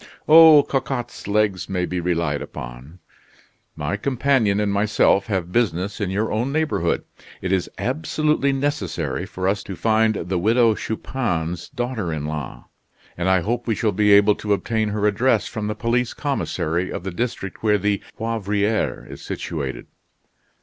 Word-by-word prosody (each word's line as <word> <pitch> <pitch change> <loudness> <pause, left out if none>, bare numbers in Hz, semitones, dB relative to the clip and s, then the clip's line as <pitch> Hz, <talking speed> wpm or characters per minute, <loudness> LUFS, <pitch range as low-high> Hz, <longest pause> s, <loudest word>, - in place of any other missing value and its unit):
"Oh, 155 -2 +9
Cocotte's 130 -5 -3
legs 100 -3 0
may 90 -2 0
be 90 0 -3
relied 85 -4 -1
upon." - - -9 0.8
"My 75 +7 -2
companion 125 -4 +1
and 105 -1 0
myself 100 -1 +2
have 95 -5 -2
business 100 -2 0
in 100 - -1
your 105 +4 -1
own 120 +5 -1
neighborhood. 150 - 0 0.4
It 95 - -3
is 95 -2 0
absolutely 140 - 0
necessary 135 - -2
for 95 0 -3
us 100 +1 +1
to 95 - -7
find 110 +2 +2
the 90 0 -2
Widow 115 +4 +4
Chupin's 90 -8 -3
daughter 120 -8 -3
in 75 -2 -3
law; 75 -4 -5 0.5
and 85 +2 -1
I 95 -1 +3
hope 120 +6 -2
we 110 - +1
shall 110 +1 +1
be 105 +1 +2
able 100 +1 +6
to 105 -1 0
obtain 110 +1 -1
her 105 0 -1
address 105 0 +2
from 105 -1 -4
the 105 - -2
police 120 +2 0
commissary 95 - -2
of - - -5
the 95 - -4
district 100 -1 -4
where 105 -1 +3
the 100 0 0 0.2
Poivriere 105 -1 -1
is - - -10
situated." 70 -6 -5
105 Hz, 155 wpm, -22 LUFS, 90-115 Hz, 0.8 s, Oh